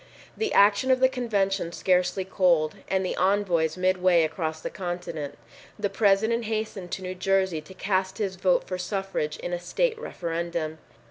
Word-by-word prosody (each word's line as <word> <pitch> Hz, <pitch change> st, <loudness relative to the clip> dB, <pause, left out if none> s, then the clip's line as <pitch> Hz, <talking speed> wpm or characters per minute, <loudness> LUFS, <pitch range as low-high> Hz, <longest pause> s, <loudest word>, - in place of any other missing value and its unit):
The 440 Hz, -1 st, -1 dB
action 205 Hz, +5 st, +4 dB
of 260 Hz, 0 st, +4 dB
the 260 Hz, -, +6 dB
convention 200 Hz, -8 st, -1 dB
scarcely 180 Hz, +1 st, +1 dB
cold, 175 Hz, -5 st, +2 dB
and 190 Hz, -1 st, 0 dB
the -, -, -2 dB
envoys 185 Hz, -5 st, +2 dB
mid 185 Hz, 0 st, +1 dB
way 180 Hz, -2 st, +5 dB
across 160 Hz, 0 st, -2 dB
the -, -, -5 dB
continent, 175 Hz, -5 st, -5 dB, 0.4 s
the 205 Hz, -2 st, -1 dB
President 220 Hz, +3 st, +2 dB
hastened 215 Hz, -4 st, -3 dB
to 190 Hz, -, -4 dB
New 185 Hz, 0 st, -4 dB
Jersey 190 Hz, -3 st, +1 dB
to 155 Hz, +5 st, -13 dB
cast 190 Hz, 0 st, -1 dB
his 200 Hz, -4 st, -2 dB
vote 185 Hz, 0 st, +2 dB
for 185 Hz, -1 st, -5 dB
suffrage 180 Hz, -5 st, -2 dB
in 175 Hz, -, -5 dB
a 175 Hz, -, -1 dB
state 455 Hz, -, 0 dB
referendum. 170 Hz, -, -3 dB
185 Hz, 165 wpm, -26 LUFS, 175-200 Hz, 0.4 s, the